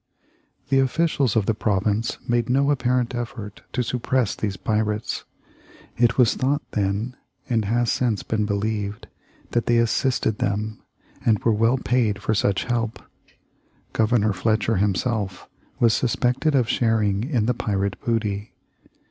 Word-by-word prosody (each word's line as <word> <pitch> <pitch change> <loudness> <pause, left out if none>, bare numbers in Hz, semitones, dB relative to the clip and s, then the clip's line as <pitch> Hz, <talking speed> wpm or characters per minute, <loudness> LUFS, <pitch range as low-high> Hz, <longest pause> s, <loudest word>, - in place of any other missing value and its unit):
The 135 0 +4
officials 135 -2 +1
of 110 -3 +2
the 110 - +2
province 105 +2 0
made 120 0 +1
no 140 +3 +3
apparent 125 -2 +1
effort 115 -4 -6
to 125 - 0
suppress 125 -1 0
these 100 -2 -3
pirates. 105 0 -1 0.7
It 120 0 +2
was 125 -4 +5
thought 140 +3 0
then, 105 +4 -1 0.3
and 115 -3 +1
has 120 +3 +1
since 115 -5 0
been 105 -1 -1
believed, 105 0 -2 0.5
that 120 - 0
they 120 - +4
assisted 115 -1 +1
them, 105 +2 -2 0.4
and 110 -2 +4
were 115 - +3
well 115 +4 +3
paid 120 -5 +1
for 110 - 0
such 100 -2 +1
help. 115 -2 -1 1.0
Governor 110 -2 +2
Fletcher 110 +2 +1
himself 100 0 -1 0.3
was 115 -2 +4
suspected 125 +5 +1
of 125 -4 +3
sharing 110 -4 +1
in 125 -5 0
the 125 - +2
pirate 100 -5 -2
booty. 105 -3 -1
115 Hz, 140 wpm, -23 LUFS, 105-125 Hz, 1.0 s, was